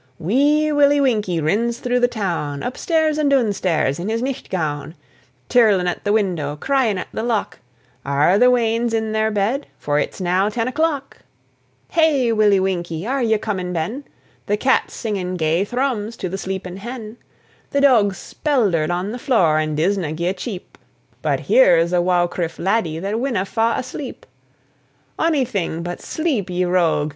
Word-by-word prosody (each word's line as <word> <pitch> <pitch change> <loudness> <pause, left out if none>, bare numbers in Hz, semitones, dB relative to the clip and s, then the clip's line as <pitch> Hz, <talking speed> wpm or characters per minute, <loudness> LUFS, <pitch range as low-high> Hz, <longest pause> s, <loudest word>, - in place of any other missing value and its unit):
Wee 290 - +2
Willie 290 -1 +4
Winkie 210 -10 +1
rins 220 +10 0
through 250 0 0
the 245 - +4
town, 170 -11 -3
Up 250 - -3
stairs 315 -2 +1
and 295 -2 +2
doon 250 -7 +3
stairs, 165 -6 0
in 185 +5 -3
his 230 +2 -1
nicht 270 0 -4
gown, 155 -3 -3 0.5
Tirlin' 210 -7 +4
at 175 - -3
the 205 - +2
window, 175 -9 0
cryin' 245 - +1
at 185 - -5
the - - -3
lock, 230 -3 -2 0.4
"Are 145 +8 +2
the 250 +1 +6
weans 230 -1 +1
in 220 -1 -1
their 220 0 +1
bed? 220 +7 -1
for 145 0 0
it's - - -3
now 185 +2 +1
ten 230 +2 -2
o'clock." 285 0 -1 0.7
Hey, 295 -7 +3
Willie 210 -3 +4
Winkie! 175 -2 -2
are 265 +3 -1
ye 220 -2 +2
comin' 190 -4 -3
ben? 180 - -3 0.4
The 205 - +1
cat's 265 +4 +1
singin' 190 -5 -3
gay 160 +2 +1
thrums 235 -1 -2
to 185 - -4
the 190 - -4
sleepin' 190 -1 -5
hen, 225 +1 -8 0.5
The 280 - 0
doug's 220 -8 +4
speldered 205 - 0
on 180 +4 -2
the 245 - -6
floor, 175 - +2
and 155 -1 -2
disna 170 -1 0
gie 170 +3 -1
a - - 0
cheep; 195 -3 -8 0.4
But - - 0
here's 175 - +4
a 175 - +3
waukrife 175 -2 0
laddie 185 -4 0
that 200 +6 -2
winna 240 -7 -1
fa' 225 +3 0
asleep. 255 +1 -6 0.9
Onything 250 - 0
but 175 0 -5
sleep, 280 - -2
ye 180 0 0
rogue! 170 -4 +1
210 Hz, 170 wpm, -20 LUFS, 175-250 Hz, 0.9 s, the